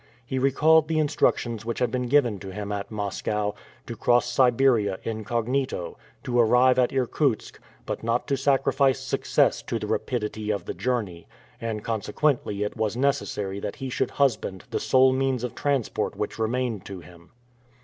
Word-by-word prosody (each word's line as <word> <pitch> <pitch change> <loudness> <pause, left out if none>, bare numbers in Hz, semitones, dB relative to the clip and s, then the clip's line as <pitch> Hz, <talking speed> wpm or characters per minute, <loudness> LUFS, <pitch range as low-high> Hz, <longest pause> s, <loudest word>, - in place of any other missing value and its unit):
He 130 +2 -2
recalled 155 +4 +4
the 160 0 0
instructions 135 -7 +1
which 115 +1 -3
had 125 -2 0
been 125 -1 -1
given 120 -6 +3
to 95 - -8
him 105 +1 -5
at 100 -1 -4
Moscow 105 0 -2 0.3
to - - -6
cross 120 0 +3
Siberia 120 -5 +3
incognito, 115 +1 -2 0.3
to 120 -1 0
arrive 125 +3 +5
at 125 - +3
Irkutsk, 130 -1 -1 0.3
but - - -4
not 115 +2 0
to 140 - +2
sacrifice 135 0 +2
success - - +1
to - - -3
the - - -4
rapidity 110 -3 -2
of 105 -2 -1
the - - -4
journey; 105 -10 -3 0.3
and 110 -2 -3
consequently 110 0 -1
it 105 - -4
was 110 +1 -1
necessary 125 -8 -1
that 100 0 -5
he 135 -3 -6
should - - 0
husband 120 -9 0
the - - -1
sole 130 0 +4
means 130 -2 0
of 125 - -3
transport 130 -1 -1
which - - -4
remained 115 -2 -1
to 95 -2 -8
him. 85 0 -16
120 Hz, 165 wpm, -25 LUFS, 105-130 Hz, 0.3 s, arrive